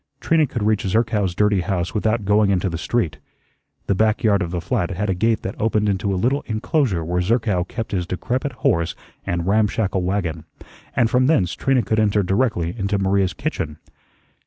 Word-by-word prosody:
Trina 160 -2 +2
could 120 -5 -3
reach 105 -1 +2
Zerkow's 105 -2 0
dirty 105 -1 +2
house 90 0 -2
without 110 0 0
going 105 0 +3
into 95 -1 +1
the 85 - -3
street. 90 -3 -1 0.7
The - - +1
back 110 +4 +1
yard 100 -3 +3
of 85 - -2
the 90 0 -3
flat 90 +1 -1
had 100 +1 -1
a - - +2
gate 110 +5 0
that 95 - -3
opened 105 -1 +1
into 100 0 0
a 95 - 0
little 130 +9 +1
inclosure 110 - 0
where 90 +2 0
Zerkow 100 -3 +1
kept 115 +2 -5
his 90 -3 -1
decrepit 130 +10 -2
horse 85 0 +2 0.3
and 85 -1 -1
ramshackle 105 -1 +1
wagon, 90 -4 -2 0.5
and 120 - +3
from 125 +2 +2
thence 95 - +2
Trina 135 -3 +1
could 110 - 0
enter 105 -1 +2
directly 95 -3 0
into 100 -2 -1
Maria's 95 -1 +1
kitchen. 105 - -3
100 Hz, 185 wpm, -21 LUFS, 90-110 Hz, 0.7 s, going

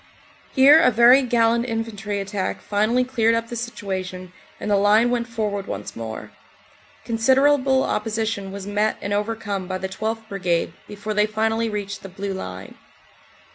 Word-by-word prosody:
Here 280 +3 +8
a 325 - +5
very 240 +3 +6
gallant 235 -1 +2
infantry 220 -3 -3
attack 195 -1 -3
finally 215 +5 +1
cleared 230 -3 +2
up 230 0 -2
the 240 - -5
situation 185 -6 -5 0.3
and 210 - -3
the - - +5
line 210 +4 +4
went 240 -1 -1
forward 210 -4 -3
once 100 +1 -6
more. 110 -1 -7 0.7
Considerable 265 +3 +3
opposition 220 -2 -2
was 200 0 -7
met 205 +1 0
and 200 - -3
overcome 205 -2 -2
by 185 0 -3
the 190 - -4
12th. 220 +3 -4
Brigade 180 -5 -1
before 210 +1 -5
they 210 0 +2
finally 225 +1 0
reached 205 -1 -5
the 195 - -9
Blue 195 +1 -5
Line. 190 - -7
215 Hz, 155 wpm, -22 LUFS, 200-230 Hz, 0.7 s, Here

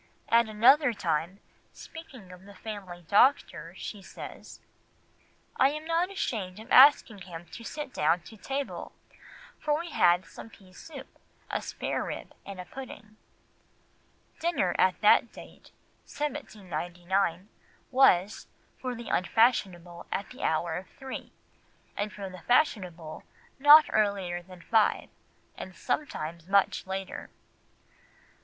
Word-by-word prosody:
At 230 -1 +4
another 250 +5 +5
time, 185 -1 -2 0.3
speaking 260 - -12
of 180 +1 -13
the 200 0 -14
family 185 -5 -8
doctor, 180 - +2
she 205 - -7
says— - - -10 1.0
"I 270 +2 +4
was 305 +1 -6
not 335 +2 +1
ashamed 215 - -3
of 220 - -12
asking 260 -6 +7
him 175 -2 -9
to 230 - -9
sit 295 +2 -6
down 165 +4 +2
to 220 - -13
table, 270 +6 -5 0.7
for 300 -1 +1
we 340 0 -6
had 175 +1 +3
some - - -11
pease 190 -3 -17
soup, 290 -5 -10 0.4
a - - -1
sparerib, - - -4 0.2
and 195 -2 -8
a 180 - -6
pudding." 220 -3 -10 1.2
Dinner 345 +1 +1
at - - +3
that - - +5
date - - -14 0.4
(1799) 190 - -3 0.4
was, 210 -7 +3 0.3
for 255 -1 -4
the 235 0 -8
unfashionable, 180 -4 +1
at 200 - -3
the 255 - -11
hour 160 +1 0
of 185 - -13
three, 265 -1 -7 0.6
and 205 +1 -2
for 200 -2 -7
the 185 -2 -10
fashionable 180 - 0 0.4
not 295 +2 +9
earlier 195 -4 0
than 180 0 -14
five, 220 -2 +2 0.5
and 185 - -9
sometimes 170 - -4
much 195 -1 +2
later. 190 0 -5
200 Hz, 125 wpm, -28 LUFS, 180-260 Hz, 1.2 s, not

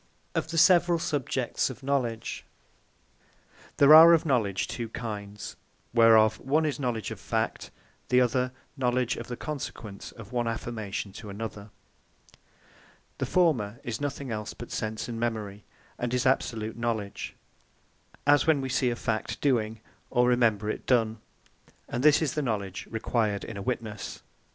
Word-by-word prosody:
OF - - -1
THE 165 +1 -4
SEVERALL 175 0 +5
SUBJECTS 135 -6 -1
OF 130 +1 -9
KNOWLEDGE 130 -5 -2 1.3
There 145 +1 +8
are 165 +2 +11
of 165 - +3
KNOWLEDGE 110 - +1
two 115 -2 -5
kinds; 105 -3 -6 0.4
whereof 110 -2 +6
one 150 +4 +1
is 150 -2 -2
Knowledge 120 -6 -2
Of - - -6
Fact: - - -2 0.4
the 125 - +5
other 125 +1 +1 0.2
Knowledge 125 -2 +1
Of - - -6
The 120 - -5
Consequence 120 -8 -6
Of 115 -1 -12
One 120 -1 -1
Affirmation 110 -3 -4
To 105 - -9
Another. 105 0 -6 1.5
The - - -1
former 125 - +2
is 120 +3 -4
nothing 140 -2 -3
else, 105 -1 -4
but 120 - -9
Sense 110 -1 -3
and 115 -2 -5
Memory, 105 -4 -3 0.4
and 120 -1 -2
is 125 - 0
Absolute 115 -4 0
Knowledge; 110 -4 -3 0.9
as 145 +1 +4
when 155 -3 +4
we 135 -1 -3
see 125 0 +2
a 120 - -1
Fact 115 -2 -2
doing, 115 -5 0 0.3
or 125 -1 +3
remember 115 -4 +2
it 110 - -4
done: 115 -3 +2 0.7
And 120 - -3
this 150 +1 +6
is 145 - -1
the 150 - -1
Knowledge 100 -8 -3
required 110 -2 -1
in 115 - -7
a 100 - -5
Witnesse. 110 -2 -4
120 Hz, 150 wpm, -28 LUFS, 110-135 Hz, 1.5 s, are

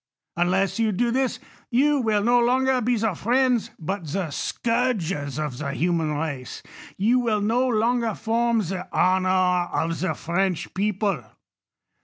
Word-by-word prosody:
Unless 190 +3 +1
you 225 -1 +2
do 235 +5 0
this, 255 -1 0 0.3
you 285 +4 +3
will 215 -3 +1
no 240 +2 +4
longer 255 +2 +2
be 245 +1 +1
the 220 -2 0
friends, 245 +4 +1
but 180 +1 -4
the 180 -3 -2
scourges 195 - -1
of 150 -5 -3
the 140 -2 -3
human 165 -3 0
race; 145 -5 -5 0.3
you 230 +6 +3
will 225 -4 +1
no 230 +5 +1
longer 235 -1 +1
form 230 +1 +1
the 185 -1 -4
honor 185 0 +2 0.4
of 165 0 -1
the 185 - -1
French 180 +1 -2
people. 200 - -1
210 Hz, 145 wpm, -24 LUFS, 175-240 Hz, 0.4 s, no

